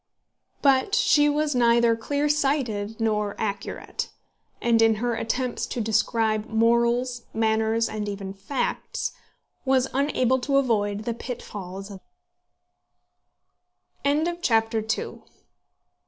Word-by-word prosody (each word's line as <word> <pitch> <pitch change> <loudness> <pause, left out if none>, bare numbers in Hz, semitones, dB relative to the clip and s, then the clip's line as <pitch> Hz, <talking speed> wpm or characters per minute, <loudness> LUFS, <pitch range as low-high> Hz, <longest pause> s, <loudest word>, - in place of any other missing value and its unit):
But 275 +8 +4
she 295 -11 +4
was 295 0 0
neither 235 -1 +4
clear 285 +6 -1
sighted 265 -8 0
nor 210 -2 0
accurate; 205 -2 -4 0.5
and 230 -1 +3
in 225 -1 +5
her 240 +2 -1
attempts 240 +2 -2
to - - -4
describe 220 0 +1
morals, 235 +2 +1
manners, 220 0 +1
and 210 -1 -4
even 195 -1 -5
facts, 200 +8 -3 0.5
was 265 -1 +2
unable 260 -2 +2
to 275 +2 +1
avoid 210 -6 +1
the 235 - -2
pitfalls 195 -5 -7
of 195 - -9 2.0
exaggeration. 245 -8 0
230 Hz, 100 wpm, -25 LUFS, 220-260 Hz, 2.0 s, in